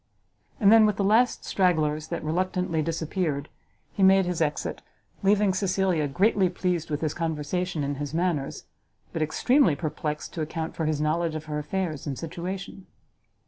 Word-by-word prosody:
And 205 -3 +6
then, 220 -1 +7
with 210 - +1
the 200 - -1
last 225 +5 +3
stragglers 155 -5 +1
that - - -4
reluctantly 180 +1 0
disappeared, 160 -2 -2 0.4
he - - -3
made 190 0 +6
his 175 -2 -2
exit, 150 -2 -1 0.4
leaving 200 -1 +3
Cecilia 185 -4 +1
greatly 190 +5 +2
pleased 175 -2 -2
with 150 -1 -2
his 155 -2 -1
conversation 165 +1 -2
and 140 0 -2
his 145 -1 -4
manners, 165 -4 -1 0.5
but 165 - -2
extremely 170 - +3
perplexed 150 -1 -4
to 165 - -4
account 160 +1 -4
for 160 - -2
his 155 -1 0
knowledge 160 +1 0
of 155 0 -5
her 150 -1 -3
affairs 155 -1 -3
and 135 -3 -3
situation. 185 +3 -6
165 Hz, 160 wpm, -26 LUFS, 155-190 Hz, 0.5 s, then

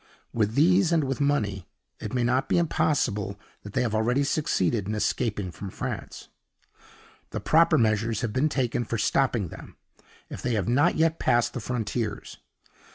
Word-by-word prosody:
With 110 -1 0
these 180 +4 +4
and 165 -2 +3
with 135 +1 -2
money, 105 -10 0 0.3
it - - -6
may 125 -2 0
not 125 +3 +1
be - - +3
impossible 125 - 0 0.2
that 100 - -10
they - - +1
have 115 -3 -2
already 120 +6 +2
succeeded 115 - 0
in 110 - -2
escaping 105 -2 -1
from 100 +3 -7
France. - - -6 1.0
The - - -4
proper 165 +2 +4
measures 110 0 +1
have 110 -3 -2
been 145 +4 +2
taken 125 -4 -1
for 115 0 -3
stopping 115 -3 +1
them, - - -12 0.5
if - - -8
they 120 -2 -1
have 100 -4 -1
not 145 +8 +3
yet 160 +1 +1
passed 120 0 +2
the - - -4
frontiers. 115 -1 -4
120 Hz, 165 wpm, -26 LUFS, 105-140 Hz, 1.0 s, these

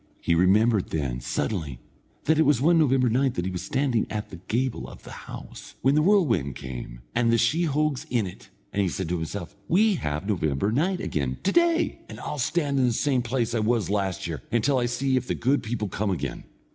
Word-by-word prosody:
He - - +1
remembered 100 +4 +3
then, 70 -6 -2
suddenly, 70 - -2 0.4
that 160 +1 +2
it - - +6
was 145 -5 +3
one 165 +5 +4
November 135 -4 +3
night 125 +2 +1
that 90 - -2
he 95 - -2
was 90 - -4
standing 130 -4 0
at 105 -1 -4
the 90 - -7
gable 125 +1 -1
of - - -12
the - - -11 0.2
house, - - -9
when 135 - +4
the 150 - +4
whirlwind 135 - +2
came, - - -7
and 115 -1 +2
the 115 - +4
sheehogues 150 +2 +1
in 120 -4 +1
it, 90 - -10 0.2
and 100 - +1
he 95 - +1
said 95 +1 -3
to 90 - 0
himself: 85 +2 -5
"We 210 +5 +4
have 75 - -3
November 85 -2 0
night 180 +10 +1
again 65 -4 -2
to 195 - +2
day, 340 +2 +2
and - - -9
I'll 150 - -4
stand 140 0 0
in 125 - +4
the 120 - +1
same 130 +1 +1
place 120 -1 -1
I 115 - +1
was 110 -2 +1
last 100 -3 -1
year, 80 -6 -4
until 120 +3 +2
I 120 - +1
see 130 +2 0
if 125 0 -2
the - - -1
good 135 +4 +1
people 110 -1 -3
come 100 +2 -2
again. 95 - -3
115 Hz, 220 wpm, -26 LUFS, 95-140 Hz, 0.4 s, it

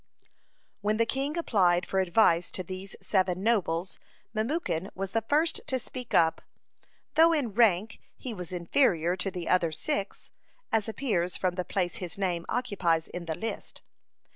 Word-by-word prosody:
(41) - - -38 0.5
When 210 +1 +1
the 230 - +3
king 275 +6 -2
applied 180 - +3
for 190 - 0
advice 175 -2 +3
to 185 - -4
these 185 +2 -7
seven 185 -1 +1
nobles, 185 -5 0 0.3
Memucan 220 - -1
was 195 0 -4
the 225 - +1
first 300 +8 +1
to 260 - +1
speak 250 0 -5
up, 160 -1 +4 0.7
though 325 +2 +6
in 265 -9 -1
rank 215 -1 +3 0.2
he 250 - -5
was 180 -4 -7
inferior 175 - +2
to 190 +1 0
the 180 -3 -6
other 175 -3 +3
six, 205 - -3 0.4
as 220 -1 +1
appears 205 -8 -1
from 185 -1 0
the 180 0 -2
place 180 -2 -1
his 180 -1 -6
name 180 -4 -1
occupies 185 -10 0
in 175 -1 -6
the 160 -1 -2
list. 225 +5 -6
195 Hz, 165 wpm, -28 LUFS, 175-230 Hz, 0.7 s, though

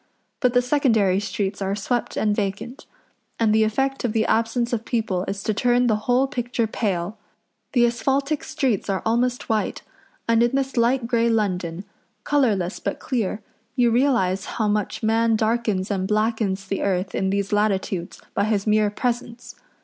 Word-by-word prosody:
But 250 -1 +1
the 245 - +4
secondary 225 -8 +2
streets 200 -1 -3
are 195 0 -1
swept 235 +4 -2
and 210 -1 +1
vacant; 205 +6 -4 0.5
and 220 -2 +3
the 220 0 +4
effect 270 +6 0
of 235 -3 0
the 220 -1 +2
absence 230 +2 +1
of 230 -1 -1
people 220 -7 -1
is 195 0 -4
to 215 - 0
turn 245 +2 +2
the 225 -3 +3
whole 250 +2 +4
picture 245 -3 -2
pale. 200 -3 -2 0.5
The 240 -3 +5
asphaltic 275 +5 0
streets 260 -10 -1
are 195 -1 -1
almost 245 +2 0
white, 220 -1 -1 0.4
and 230 0 +4
in 240 +2 +2
this 270 -1 -1
light 240 +1 +2
grey 235 0 +2
London, 185 -5 -1 0.4
colourless 215 -11 +1
but - - -3
clear, 220 -4 -2 0.3
you 240 -2 +3
realise 225 -7 +2
how 220 -2 +1
much 210 +2 -1
man 225 +1 +3
darkens 220 -3 0
and 190 -1 -1
blackens 215 -2 0
the 195 0 -3
earth 190 0 -1
in 190 - 0
these 200 +1 -1
latitudes 195 -4 -1
by 200 - +1
his 210 -2 0
mere 215 -1 +3
presence. 240 +2 -3
220 Hz, 165 wpm, -23 LUFS, 200-245 Hz, 0.5 s, The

